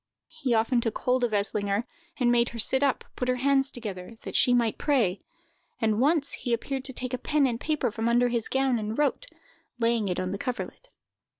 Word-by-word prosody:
He 250 Hz, -4 st, -1 dB
often 230 Hz, +2 st, +2 dB
took 225 Hz, -2 st, -2 dB
hold 250 Hz, 0 st, 0 dB
of 240 Hz, -, +1 dB
Eslinger, 205 Hz, 0 st, 0 dB, 0.4 s
and 245 Hz, -2 st, +3 dB
made 240 Hz, 0 st, +3 dB
her 235 Hz, -, -9 dB
sit 265 Hz, +4 st, +2 dB
up, 280 Hz, -2 st, +1 dB
put 250 Hz, -, -3 dB
her 255 Hz, -, +2 dB
hands 270 Hz, +1 st, +4 dB
together, 215 Hz, -4 st, -7 dB
that -, -, -7 dB
she 250 Hz, -, +4 dB
might 235 Hz, -3 st, +1 dB
pray; 230 Hz, -11 st, +1 dB, 0.6 s
and 220 Hz, 0 st, +1 dB
once 285 Hz, 0 st, +3 dB
he 245 Hz, -, -1 dB
appeared 265 Hz, +3 st, -3 dB
to 265 Hz, -, -2 dB
take 255 Hz, 0 st, -3 dB
a 255 Hz, -, -2 dB
pen 295 Hz, +2 st, +1 dB
and 235 Hz, -3 st, -1 dB
paper 300 Hz, -6 st, -1 dB
from 225 Hz, +2 st, -1 dB
under 245 Hz, +1 st, +3 dB
his 235 Hz, -2 st, -1 dB
gown, 265 Hz, -3 st, +1 dB
and 215 Hz, +1 st, -4 dB
wrote, 295 Hz, -, 0 dB, 0.5 s
laying 230 Hz, -2 st, +1 dB
it 180 Hz, -, -2 dB
on 185 Hz, 0 st, -2 dB
her 195 Hz, -, -4 dB
coverled. 250 Hz, -, -5 dB
245 Hz, 210 wpm, -27 LUFS, 225-265 Hz, 0.6 s, hands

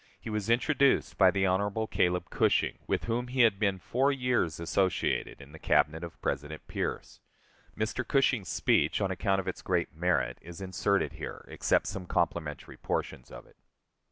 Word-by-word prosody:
He 115 Hz, -, -7 dB
was 105 Hz, 0 st, -2 dB
introduced 135 Hz, +3 st, +2 dB
by 95 Hz, -2 st, +7 dB
the 95 Hz, +1 st, +1 dB
Hon. 100 Hz, +4 st, 0 dB
Caleb 90 Hz, 0 st, +1 dB
Cushing, -, -, +1 dB
with -, -, 0 dB
whom 120 Hz, +2 st, -1 dB
he 130 Hz, +1 st, +1 dB
had 110 Hz, -5 st, +4 dB
been 100 Hz, -3 st, +1 dB
four 130 Hz, +9 st, +1 dB
years 125 Hz, -, 0 dB
associated 95 Hz, +2 st, 0 dB
in 70 Hz, 0 st, -13 dB
the 80 Hz, -, -12 dB
Cabinet 80 Hz, +2 st, +2 dB
of 85 Hz, -, -8 dB
President 75 Hz, +3 st, -3 dB
Pierce. -, -, -4 dB, 0.6 s
Mr. 110 Hz, +4 st, -1 dB
Cushing's 130 Hz, -8 st, +2 dB
speech, -, -, +2 dB
on 100 Hz, -2 st, 0 dB
account 95 Hz, +1 st, 0 dB
of 95 Hz, -, -5 dB
its 95 Hz, -, -4 dB
great 90 Hz, -2 st, -1 dB
merit, 90 Hz, +1 st, 0 dB
is 85 Hz, +1 st, -10 dB
inserted 95 Hz, +1 st, 0 dB
here, -, -, -7 dB
except -, -, +1 dB
some 90 Hz, -2 st, -5 dB
complimentary 80 Hz, -4 st, -2 dB
portions 60 Hz, -, -3 dB
of -, -, -11 dB
it. -, -, -24 dB
95 Hz, 170 wpm, -29 LUFS, 85-115 Hz, 0.6 s, by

